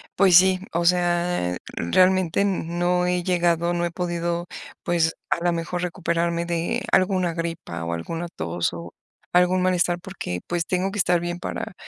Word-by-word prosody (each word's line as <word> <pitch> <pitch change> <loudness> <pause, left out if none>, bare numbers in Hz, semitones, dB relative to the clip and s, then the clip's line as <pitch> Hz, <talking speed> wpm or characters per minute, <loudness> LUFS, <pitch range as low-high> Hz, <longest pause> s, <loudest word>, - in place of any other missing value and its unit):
pues 185 -2 +5
sí, 185 0 +5
o 170 +1 0
sea, 175 - +2
eh, - - -5 0.2
realmente 185 - +2
n 195 -4 0
no 180 0 +2
he 180 0 0
llegado, 175 -1 +1
no 175 0 0
he - - -1
podido, 175 0 -2 0.4
pues, 170 -2 +1 0.2
a 170 - 0
la 175 - +3
mejor 170 +1 -3
recuperarme 170 -1 -1
de 170 -1 -1
alguna 185 -2 +2
gripa 165 - -4
o 85 +1 -3
alguna 165 - -4
tos 85 +1 -2
o 85 0 -8 0.4
algún 180 +1 +4
malestar. 180 -1 +2
Porque 170 - -6
pues, 175 -1 -2
tengo 185 +1 0
que 205 - -4
estar 180 -2 +3
bien 175 +1 -4
para 220 - -5
175 Hz, 170 wpm, -23 LUFS, 170-180 Hz, 0.4 s, pues